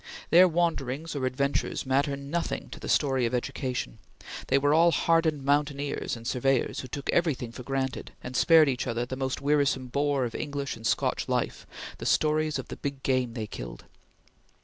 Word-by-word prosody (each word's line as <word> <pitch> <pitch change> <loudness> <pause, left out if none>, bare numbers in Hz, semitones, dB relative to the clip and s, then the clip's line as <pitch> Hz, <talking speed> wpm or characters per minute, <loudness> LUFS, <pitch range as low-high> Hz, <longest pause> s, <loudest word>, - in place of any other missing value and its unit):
Their 180 +3 +8
wanderings 160 -3 -1
or 130 -2 0
adventures 140 +2 -1
matter 140 +2 +1
nothing 140 +5 -3
to - - -8
the - - -6
story 135 -4 +2
of 120 - -2
education. 125 - -3 0.5
They 135 - +3
were 145 +1 +3
all 165 +2 +6
hardened 165 -3 +2
mountaineers 145 -1 0
and 115 - -12
surveyors 130 +1 +1
who 130 - -6
took 140 +3 -6
everything 145 -9 0
for 120 - -9
granted, 135 0 -3
and 125 - -6
spared 160 +1 +6
each 130 -1 -1
other 120 0 -1
the 130 - -5
most 130 0 -3
wearisome 140 -3 +1
bore 140 0 +1
of 115 - -5
English 145 -2 -3
and 115 0 -4
Scotch - - 0
life, - - -1 0.3
the - - -3
stories 155 0 +2
of - - -7
the - - -6
big 140 -2 -5
game 130 -3 0
they 110 -3 -3
killed. - - -8
140 Hz, 180 wpm, -28 LUFS, 130-150 Hz, 0.5 s, Their